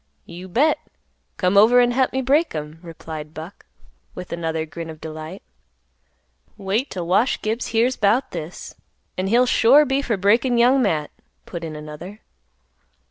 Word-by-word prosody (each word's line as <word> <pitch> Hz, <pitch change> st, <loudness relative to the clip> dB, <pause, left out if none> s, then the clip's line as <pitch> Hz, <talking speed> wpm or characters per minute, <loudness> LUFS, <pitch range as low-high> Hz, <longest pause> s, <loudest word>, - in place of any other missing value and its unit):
"You 175 Hz, +2 st, -10 dB
bet; 275 Hz, -, +2 dB, 0.6 s
come 180 Hz, +1 st, +1 dB
over 235 Hz, +4 st, +6 dB
an' 245 Hz, 0 st, +4 dB
hep 260 Hz, +1 st, +1 dB
me 265 Hz, 0 st, -2 dB
break 285 Hz, -, +2 dB
'em," 150 Hz, +1 st, -6 dB
replied 160 Hz, -2 st, -9 dB
Buck, 160 Hz, +5 st, -10 dB, 0.5 s
with 180 Hz, -, -7 dB
another 160 Hz, -1 st, -2 dB
grin 165 Hz, +2 st, -8 dB
of 155 Hz, -1 st, -9 dB
delight. 155 Hz, +4 st, -8 dB, 1.1 s
"Wait 205 Hz, +7 st, -1 dB
'till 180 Hz, -2 st, -5 dB
Wash 190 Hz, +9 st, +2 dB
Gibbs 220 Hz, +3 st, -2 dB
hears 235 Hz, +3 st, +1 dB
'bout 215 Hz, +6 st, +1 dB
this, 165 Hz, 0 st, -7 dB, 0.4 s
an' 185 Hz, +1 st, -2 dB
he'll 240 Hz, +5 st, +4 dB
sure 260 Hz, +5 st, +5 dB
be 270 Hz, 0 st, 0 dB
for 235 Hz, -6 st, -1 dB
breakin' 235 Hz, +6 st, +2 dB
Young 250 Hz, +3 st, +4 dB
Matt," 150 Hz, -10 st, 0 dB, 0.3 s
put 170 Hz, -2 st, -7 dB
in 160 Hz, -2 st, -6 dB
another. 155 Hz, +7 st, -9 dB
195 Hz, 155 wpm, -22 LUFS, 160-245 Hz, 1.1 s, over